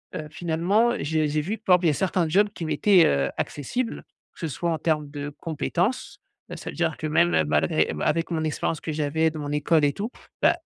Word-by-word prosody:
heu, 155 Hz, -, -5 dB
finalement, 180 Hz, +9 st, +1 dB
j'ai 155 Hz, +1 st, 0 dB
j'ai 150 Hz, +1 st, 0 dB
vu, 200 Hz, +9 st, -3 dB
par 190 Hz, -4 st, +4 dB
exemple, 180 Hz, -1 st, -1 dB
il -, -, +5 dB
y -, -, +4 dB
a -, -, 0 dB
certains 180 Hz, +1 st, 0 dB
jobs 205 Hz, +5 st, +3 dB
qui 170 Hz, -, -5 dB
m'étaient, 165 Hz, +5 st, +4 dB
heu, 70 Hz, -1 st, +2 dB
accessibles, 230 Hz, -, -3 dB, 0.3 s
que -, -, -20 dB
ce 165 Hz, -, -1 dB
soit 170 Hz, +5 st, -2 dB
en 160 Hz, -, 0 dB
termes 150 Hz, -3 st, 0 dB
de 145 Hz, 0 st, -5 dB
compétences, 175 Hz, -, -2 dB, 0.3 s
heu, -, -, -4 dB
ça -, -, -7 dB
veut -, -, -8 dB
dire 165 Hz, -3 st, 0 dB
que 155 Hz, -, -3 dB
même, 85 Hz, -, +3 dB
heu, 80 Hz, -, +4 dB
malgré 75 Hz, 0 st, +1 dB
bah, -, -, -3 dB
avec 165 Hz, +2 st, 0 dB
mon 160 Hz, -2 st, -1 dB
expérience 155 Hz, 0 st, -2 dB
que 160 Hz, -, -4 dB
j'avais 155 Hz, +2 st, +1 dB
dans 155 Hz, -, -7 dB
mon 145 Hz, 0 st, -4 dB
école 150 Hz, +2 st, +2 dB
et 145 Hz, -, +3 dB
tout, 210 Hz, +3 st, -4 dB, 0.3 s
bah, -, -, +5 dB
160 Hz, 240 wpm, -25 LUFS, 150-180 Hz, 0.3 s, il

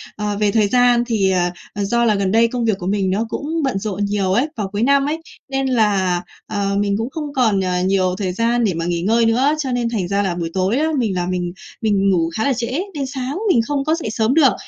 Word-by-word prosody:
Ờ, 210 Hz, -1 st, -2 dB
về 210 Hz, -1 st, +2 dB
thời 215 Hz, -1 st, +3 dB
gian 245 Hz, +1 st, +4 dB
thì, 205 Hz, -5 st, +1 dB
à, 180 Hz, -1 st, +1 dB, 0.2 s
ờ, 205 Hz, -, -2 dB
do 235 Hz, +4 st, +1 dB
là 215 Hz, -2 st, +3 dB
gần 195 Hz, -1 st, 0 dB
đây 230 Hz, +1 st, +4 dB
công 235 Hz, 0 st, -2 dB
việc 215 Hz, -4 st, +1 dB
của 180 Hz, -, -5 dB
mình 195 Hz, -1 st, 0 dB
nó 210 Hz, +4 st, 0 dB
cũng 310 Hz, +6 st, -3 dB
bận 260 Hz, -8 st, 0 dB
rộn 205 Hz, -1 st, -2 dB
nhiều 200 Hz, -2 st, 0 dB
ấy, 245 Hz, +8 st, +2 dB
vào 210 Hz, -3 st, -2 dB
cuối 210 Hz, +2 st, -1 dB
năm 280 Hz, +2 st, +3 dB
ấy, 315 Hz, +3 st, -2 dB, 0.3 s
nên 270 Hz, 0 st, -1 dB
là, 200 Hz, -7 st, +2 dB, 0.3 s
ờ, 200 Hz, -2 st, -1 dB
mình 200 Hz, -1 st, +1 dB
cũng 225 Hz, +4 st, -3 dB
không 300 Hz, -1 st, -6 dB
còn 225 Hz, -7 st, +2 dB
nh 180 Hz, -1 st, 0 dB
nhiều 185 Hz, -2 st, +1 dB
thời 190 Hz, -3 st, -2 dB
gian 235 Hz, +4 st, +1 dB
để 200 Hz, -5 st, +1 dB
mà 165 Hz, 0 st, -3 dB
nghỉ 170 Hz, -1 st, -1 dB
ngơi 225 Hz, +5 st, +2 dB
nữa. 260 Hz, +7 st, +3 dB
Cho 265 Hz, -4 st, -2 dB
nên 240 Hz, -1 st, 0 dB
thành 205 Hz, -6 st, -2 dB
ra 200 Hz, +2 st, 0 dB
là 185 Hz, -3 st, -1 dB
buổi 170 Hz, -1 st, -3 dB
tối 190 Hz, +6 st, +1 dB
á 310 Hz, +2 st, +1 dB
mình 220 Hz, -7 st, 0 dB
là 175 Hz, -, -1 dB
mình 180 Hz, -1 st, -2 dB, 0.3 s
mình 200 Hz, -3 st, +2 dB
ngủ 165 Hz, -3 st, +2 dB
khá 220 Hz, -, 0 dB
là 280 Hz, -, +2 dB
trễ 235 Hz, -1 st, -3 dB, 0.3 s
nên 280 Hz, -2 st, -3 dB
sáng 265 Hz, +3 st, -4 dB
mình 235 Hz, -, +4 dB
không 280 Hz, -2 st, -1 dB
có 315 Hz, +1 st, +2 dB
dậy 325 Hz, -10 st, -4 dB
sớm 225 Hz, +2 st, +1 dB
được. 290 Hz, -4 st, +5 dB
215 Hz, 265 wpm, -19 LUFS, 195-250 Hz, 0.3 s, được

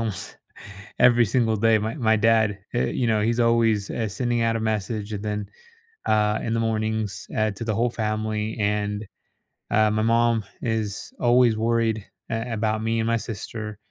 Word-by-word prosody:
almost 105 Hz, -5 st, -4 dB, 0.6 s
every 120 Hz, -1 st, +6 dB
single 115 Hz, 0 st, +1 dB
day. 110 Hz, +1 st, +4 dB
My 110 Hz, +2 st, -3 dB
my 110 Hz, -7 st, +2 dB
dad 110 Hz, -2 st, +3 dB, 0.2 s
eh, 120 Hz, -, +1 dB
you 125 Hz, -, -1 dB
know, 110 Hz, -2 st, +2 dB
he's 115 Hz, +2 st, +1 dB
always, 115 Hz, -3 st, +2 dB
eh, 110 Hz, -2 st, -2 dB
sending 120 Hz, +3 st, -1 dB
out 115 Hz, 0 st, +1 dB
a -, -, -2 dB
message 110 Hz, -1 st, -2 dB
and 100 Hz, -1 st, -4 dB
then, 105 Hz, -1 st, -3 dB, 0.6 s
uh, 105 Hz, 0 st, +2 dB
in 115 Hz, -, -1 dB
the 115 Hz, -, +1 dB
mornings, 110 Hz, -2 st, -2 dB
eh, 110 Hz, 0 st, +1 dB
to 100 Hz, +3 st, -7 dB
the 110 Hz, -, 0 dB
whole 120 Hz, +3 st, +2 dB
family, 110 Hz, -1 st, -2 dB
and, 105 Hz, 0 st, -1 dB, 0.6 s
uh, 110 Hz, 0 st, +4 dB
my 110 Hz, 0 st, 0 dB
mom 115 Hz, 0 st, +2 dB, 0.2 s
is 110 Hz, -3 st, -3 dB
always 120 Hz, -1 st, +4 dB
worried, 115 Hz, -2 st, 0 dB, 0.2 s
eh, 115 Hz, +1 st, -3 dB
about 110 Hz, 0 st, -1 dB
me 115 Hz, 0 st, 0 dB
and 110 Hz, -, 0 dB
my 115 Hz, 0 st, +2 dB
sister. 110 Hz, -1 st, -6 dB
110 Hz, 175 wpm, -24 LUFS, 105-115 Hz, 0.6 s, every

